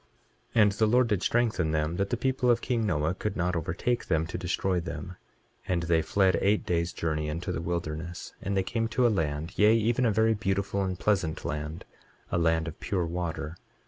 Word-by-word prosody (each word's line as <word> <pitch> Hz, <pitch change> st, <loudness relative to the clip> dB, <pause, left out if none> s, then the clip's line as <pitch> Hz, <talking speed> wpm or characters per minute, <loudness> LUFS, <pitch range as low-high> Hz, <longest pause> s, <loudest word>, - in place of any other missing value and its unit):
23:2 115 Hz, -, +6 dB
And 105 Hz, -, +4 dB
the 110 Hz, +2 st, +2 dB
Lord 125 Hz, +2 st, +4 dB
did 105 Hz, -4 st, +1 dB
strengthen 110 Hz, -9 st, +1 dB
them, 80 Hz, +2 st, 0 dB
that 100 Hz, 0 st, 0 dB
the 120 Hz, -, 0 dB
people 130 Hz, 0 st, +1 dB
of 120 Hz, -1 st, +4 dB
king 115 Hz, -3 st, 0 dB
Noah 80 Hz, -2 st, +1 dB
could 100 Hz, +2 st, -4 dB
not 90 Hz, 0 st, 0 dB
overtake 85 Hz, +9 st, -1 dB
them 80 Hz, 0 st, +1 dB
to 85 Hz, -, -7 dB
destroy 90 Hz, +1 st, 0 dB
them. 85 Hz, +1 st, -6 dB, 0.6 s
23:3 -, -, +1 dB
And 85 Hz, -1 st, 0 dB
they 85 Hz, -1 st, +2 dB
fled 95 Hz, 0 st, +2 dB
eight 105 Hz, +2 st, +2 dB
days' 85 Hz, -1 st, 0 dB
journey 75 Hz, -2 st, -2 dB
into 85 Hz, +4 st, -3 dB
the 85 Hz, -, -3 dB
wilderness. 85 Hz, 0 st, -4 dB
23:4 -, -, -8 dB
And 100 Hz, 0 st, 0 dB
they 95 Hz, -, +2 dB
came 115 Hz, +4 st, -1 dB
to 125 Hz, +2 st, +1 dB
a -, -, +6 dB
land, 80 Hz, -4 st, -2 dB
yea, 105 Hz, +2 st, +6 dB
even 115 Hz, +2 st, +2 dB
a -, -, +3 dB
very 110 Hz, +2 st, +3 dB
beautiful 100 Hz, -1 st, -1 dB
and 95 Hz, -1 st, -2 dB
pleasant 90 Hz, -6 st, 0 dB
land, 75 Hz, +2 st, -4 dB, 0.5 s
a 85 Hz, -, +1 dB
land 80 Hz, 0 st, +2 dB
of 80 Hz, -, -7 dB
pure 95 Hz, -5 st, -1 dB
water. 85 Hz, -1 st, -4 dB
90 Hz, 215 wpm, -28 LUFS, 80-105 Hz, 0.6 s, 23:2